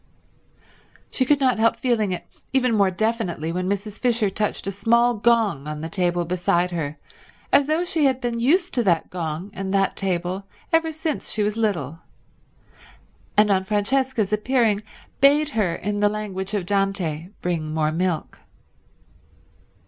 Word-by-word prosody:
She 260 Hz, -, +1 dB
could 290 Hz, +2 st, +3 dB
not 255 Hz, -4 st, +2 dB
help 230 Hz, +1 st, +3 dB
feeling 225 Hz, -6 st, 0 dB
it 180 Hz, -, -4 dB, 0.3 s
even 255 Hz, -3 st, +2 dB
more 200 Hz, -3 st, +4 dB
definitely 185 Hz, -5 st, -1 dB
when 180 Hz, +2 st, -2 dB
Mrs. 200 Hz, +1 st, -3 dB
Fisher 230 Hz, -5 st, +2 dB
touched 210 Hz, +1 st, -2 dB
a 195 Hz, -, -1 dB
small 235 Hz, +5 st, +3 dB
gong 215 Hz, -, +1 dB
on 150 Hz, 0 st, -5 dB
the 160 Hz, -, -5 dB
table 175 Hz, -1 st, 0 dB
beside 175 Hz, 0 st, +1 dB
her 155 Hz, -3 st, -3 dB, 0.6 s
as 285 Hz, -, +5 dB
though 320 Hz, +3 st, +1 dB
she 320 Hz, -4 st, +1 dB
had 260 Hz, -2 st, +2 dB
been 240 Hz, -2 st, -2 dB
used 350 Hz, +9 st, +2 dB
to 240 Hz, -, +2 dB
that 175 Hz, -5 st, +1 dB
gong 170 Hz, +2 st, -4 dB
and 190 Hz, 0 st, -4 dB
that 195 Hz, 0 st, +1 dB
table 185 Hz, +1 st, -2 dB, 0.3 s
ever 325 Hz, 0 st, +3 dB
since 315 Hz, -1 st, -3 dB
she 215 Hz, -, 0 dB
was 210 Hz, +1 st, 0 dB
little, 170 Hz, -, -1 dB, 1.4 s
and, 210 Hz, 0 st, +5 dB
on 190 Hz, -1 st, +2 dB
Francesca's 215 Hz, +2 st, 0 dB
appearing, 220 Hz, -1 st, +2 dB, 0.4 s
bade 290 Hz, +2 st, +5 dB
her 210 Hz, -, 0 dB
in 205 Hz, +1 st, -3 dB
the 205 Hz, 0 st, +4 dB
language 205 Hz, -2 st, -4 dB
of 195 Hz, -4 st, -2 dB
Dante 190 Hz, -5 st, 0 dB, 0.2 s
bring 165 Hz, -3 st, -2 dB
more 155 Hz, -1 st, 0 dB
milk. 170 Hz, 0 st, -2 dB
205 Hz, 155 wpm, -23 LUFS, 180-235 Hz, 1.4 s, as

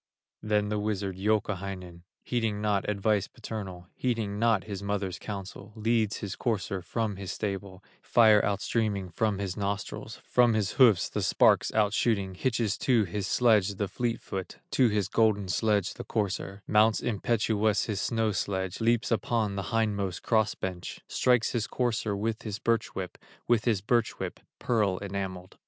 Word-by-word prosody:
Then 105 Hz, -1 st, +1 dB
the 105 Hz, 0 st, -1 dB
wizard, 100 Hz, -2 st, -2 dB
Youkahainen, 95 Hz, -4 st, -2 dB, 0.2 s
Heeding 115 Hz, -4 st, -1 dB
not 105 Hz, -2 st, 0 dB
advice 105 Hz, 0 st, +1 dB
paternal, 95 Hz, -5 st, -7 dB
Heeding 110 Hz, -5 st, -1 dB
not 115 Hz, -3 st, +3 dB
his 100 Hz, -3 st, -6 dB
mother's 100 Hz, -2 st, -2 dB
counsel, 100 Hz, +1 st, -7 dB
Leads 110 Hz, -1 st, +1 dB
his 100 Hz, -1 st, -5 dB
courser 105 Hz, -4 st, -2 dB
from 105 Hz, +2 st, -2 dB
his 95 Hz, -2 st, -5 dB
stable, 100 Hz, -2 st, -4 dB, 0.2 s
Fire 110 Hz, -3 st, +5 dB
outstreaming 100 Hz, -1 st, -1 dB
from 105 Hz, +3 st, 0 dB
his 95 Hz, -2 st, -3 dB
nostrils, 100 Hz, -1 st, -4 dB
From 120 Hz, -2 st, +4 dB
his 100 Hz, -5 st, 0 dB
hoofs, 115 Hz, -9 st, +5 dB
the -, -, -3 dB
sparks -, -, +4 dB
outshooting, 105 Hz, -2 st, +1 dB
Hitches 115 Hz, -1 st, 0 dB
to 120 Hz, -5 st, +3 dB
his 100 Hz, +1 st, -3 dB
sledge, 105 Hz, -6 st, +3 dB
the 100 Hz, +1 st, -1 dB
fleet 120 Hz, +4 st, -2 dB
foot, 95 Hz, -1 st, -6 dB
To 130 Hz, -, +4 dB
his 105 Hz, -3 st, 0 dB
golden 105 Hz, -2 st, +2 dB
sledge, 105 Hz, 0 st, +1 dB
the -, -, -7 dB
courser, 100 Hz, -1 st, -3 dB
Mounts 105 Hz, +1 st, +4 dB
impetuous 110 Hz, -2 st, +1 dB
his 105 Hz, -3 st, -2 dB
snow 115 Hz, -2 st, +1 dB
sledge, 95 Hz, -1 st, -2 dB
Leaps 115 Hz, +1 st, +2 dB
upon 110 Hz, -1 st, 0 dB
the 100 Hz, -3 st, -4 dB
hindmost 100 Hz, -5 st, -1 dB
cross 110 Hz, -2 st, +2 dB
bench, 90 Hz, -2 st, -5 dB
Strikes 125 Hz, -3 st, +2 dB
his 115 Hz, -3 st, -1 dB
courser 115 Hz, -4 st, -1 dB
with 110 Hz, +2 st, -2 dB
his 105 Hz, -2 st, -4 dB
birch 115 Hz, +1 st, 0 dB
whip, 95 Hz, -2 st, -5 dB, 0.3 s
With 120 Hz, -2 st, +2 dB
his 110 Hz, -6 st, +2 dB
birch 115 Hz, +2 st, +1 dB
whip, -, -, -5 dB, 0.2 s
pearl 105 Hz, -6 st, +1 dB
enamelled. 95 Hz, -2 st, -5 dB
105 Hz, 155 wpm, -28 LUFS, 100-110 Hz, 0.3 s, Fire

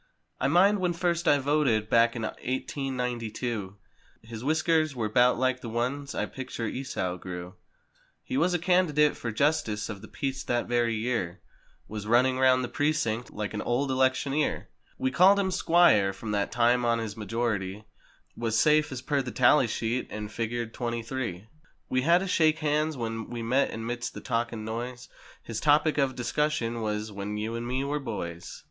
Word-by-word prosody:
I 135 Hz, -, +1 dB
mind 190 Hz, +7 st, +4 dB
when 180 Hz, -2 st, +1 dB
first 170 Hz, 0 st, -1 dB
I 145 Hz, -, +6 dB
voted 135 Hz, -6 st, +1 dB
back 115 Hz, +1 st, +4 dB
in 110 Hz, -2 st, -2 dB
eighteen 130 Hz, +1 st, -3 dB
ninety 120 Hz, -2 st, -2 dB
two. 105 Hz, -5 st, -4 dB, 0.5 s
His 110 Hz, 0 st, -8 dB
whiskers 155 Hz, 0 st, +1 dB
were 110 Hz, -3 st, -1 dB
'bout 125 Hz, +3 st, +4 dB
like 130 Hz, 0 st, 0 dB
the 115 Hz, -, -6 dB
ones 130 Hz, +5 st, -2 dB
I -, -, 0 dB
picture 130 Hz, -3 st, -6 dB
Esau 100 Hz, -7 st, -3 dB
grew. 90 Hz, 0 st, -7 dB, 0.7 s
He 260 Hz, -, -5 dB
was 180 Hz, -9 st, +2 dB
candidate 170 Hz, -4 st, +3 dB
for 115 Hz, -, -4 dB
Justice 125 Hz, -4 st, 0 dB
of 100 Hz, -3 st, -6 dB
tht 110 Hz, -, -12 dB
Peace 135 Hz, -1 st, -3 dB
that 120 Hz, -1 st, 0 dB
very 120 Hz, -1 st, +1 dB
year 110 Hz, -6 st, -2 dB, 0.5 s
Was 105 Hz, -1 st, -6 dB
running 130 Hz, +3 st, +3 dB
round 130 Hz, -1 st, +4 dB
the -, -, -2 dB
precinct 125 Hz, -6 st, -1 dB
like 105 Hz, 0 st, -4 dB
an 105 Hz, -, -3 dB
old 130 Hz, +3 st, 0 dB
elec¬ 130 Hz, 0 st, +3 dB
tioneer. 145 Hz, +2 st, -1 dB, 0.3 s
We've 130 Hz, 0 st, -1 dB
called 190 Hz, +6 st, +6 dB
him 190 Hz, -2 st, +1 dB
"Squire" 165 Hz, -, +4 dB
from 105 Hz, +2 st, -6 dB
that 100 Hz, -1 st, 0 dB
time 120 Hz, +1 st, +3 dB
on 115 Hz, -1 st, +2 dB
as 110 Hz, -2 st, -3 dB
his 100 Hz, -, -12 dB
majority 105 Hz, -2 st, -2 dB, 0.5 s
Was 115 Hz, -1 st, -1 dB
safe, 150 Hz, +4 st, +4 dB
as 130 Hz, -1 st, -6 dB
per 140 Hz, 0 st, +1 dB
the 125 Hz, -, -5 dB
tally 125 Hz, +1 st, +4 dB
sheet, 115 Hz, +3 st, -2 dB
and 105 Hz, 0 st, -6 dB
figured 115 Hz, 0 st, -3 dB
"23." 120 Hz, -1 st, -3 dB, 0.4 s
52 95 Hz, +5 st, -15 dB, 0.4 s
We 130 Hz, -, +1 dB
had 170 Hz, +6 st, +4 dB
a -, -, -3 dB
shake 160 Hz, -3 st, +3 dB
hands 155 Hz, 0 st, 0 dB
when 115 Hz, -1 st, -4 dB
we 120 Hz, -1 st, -5 dB
met 130 Hz, +4 st, +2 dB
and 115 Hz, 0 st, -6 dB
midst 120 Hz, +1 st, -4 dB
the -, -, -7 dB
talk 120 Hz, -1 st, -1 dB
and 110 Hz, -2 st, -6 dB
noise 120 Hz, +3 st, -5 dB, 0.3 s
His 115 Hz, -2 st, -4 dB
topic 150 Hz, +2 st, +3 dB
of 135 Hz, -2 st, +1 dB
discussion 120 Hz, -2 st, -1 dB
was—"When 105 Hz, -1 st, -3 dB
you 110 Hz, +2 st, -3 dB
and 115 Hz, +1 st, -4 dB
me 130 Hz, +2 st, -1 dB
were 145 Hz, +2 st, -1 dB
boys!" 90 Hz, -9 st, -6 dB
120 Hz, 185 wpm, -28 LUFS, 110-145 Hz, 0.7 s, I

